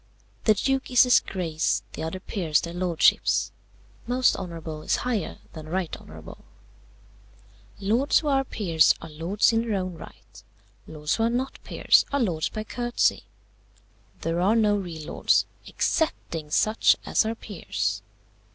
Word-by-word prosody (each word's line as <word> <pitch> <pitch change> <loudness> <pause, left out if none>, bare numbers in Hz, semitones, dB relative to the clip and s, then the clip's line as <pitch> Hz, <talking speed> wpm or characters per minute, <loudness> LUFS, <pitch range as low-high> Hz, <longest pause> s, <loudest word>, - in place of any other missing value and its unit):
The 215 - +5
Duke 270 +5 -1
is 250 -2 +6
his 250 -1 +5
Grace; 165 -4 -2
the - - -6
other 160 +4 -4
Peers 175 -6 0
their 170 - -6
Lordships. 175 -2 +2 0.6
Most 250 +1 +3
honourable 165 -4 -6
is - - +1
higher 230 -8 -2 0.2
than 155 -1 -9
right 180 -1 -2
honourable. - - -12 1.4
"Lords 230 +8 +2
who 310 - -1
are 270 -1 +2
peers 175 -11 +2
are 165 - -10
lords 175 +9 +1
in 225 - +2
their 230 -3 -2
own 185 -1 -3
right. 165 - -14 0.5
Lords 150 -1 -2
who - - -2
are - - +2
not 255 +3 -3
peers - - +3
are 280 - +1
lords 175 - 0
by 215 - -5
courtesy: 240 +2 0 1.0
there 165 +1 -1
are 200 +5 +3
no 210 -2 +3
real 170 -6 -5
lords, - - +2 0.2
excepting 165 - -1
such 215 +8 +3
as - - +2
are 220 +1 -2
peers. 100 - -3
190 Hz, 150 wpm, -25 LUFS, 165-230 Hz, 1.4 s, is